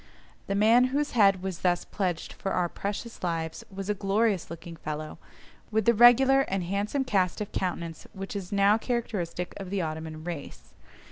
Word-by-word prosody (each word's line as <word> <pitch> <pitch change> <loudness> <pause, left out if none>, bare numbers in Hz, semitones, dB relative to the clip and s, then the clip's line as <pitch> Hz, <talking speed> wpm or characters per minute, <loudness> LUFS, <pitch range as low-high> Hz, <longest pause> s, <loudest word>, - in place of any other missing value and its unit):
The 195 - -1
man 225 +5 +5
whose 285 +3 0
head 195 -5 +4
was 190 -2 -4
thus 175 -1 +1
pledged 180 -5 -3
for 195 - -3
our 180 -1 +1
precious 205 +6 -5
lives 165 -2 -3
was 195 0 -6
a 210 - +2
glorious 200 -1 +1
looking 165 0 -8
fellow, 155 0 -6 0.5
with 220 -1 +1
the 235 - +5
regular 250 +4 +7
and 195 -8 -1
handsome 200 +9 -1
cast 190 -8 +1
of 210 - -4
countenance 170 -3 -3
which 195 0 -7
is 195 -1 -5
now 200 +2 +4
characteristic 195 -8 -3
of 195 -2 -7
the 195 -2 -1
Ottoman 155 0 -5
race. 150 - -7
195 Hz, 175 wpm, -28 LUFS, 175-215 Hz, 0.5 s, regular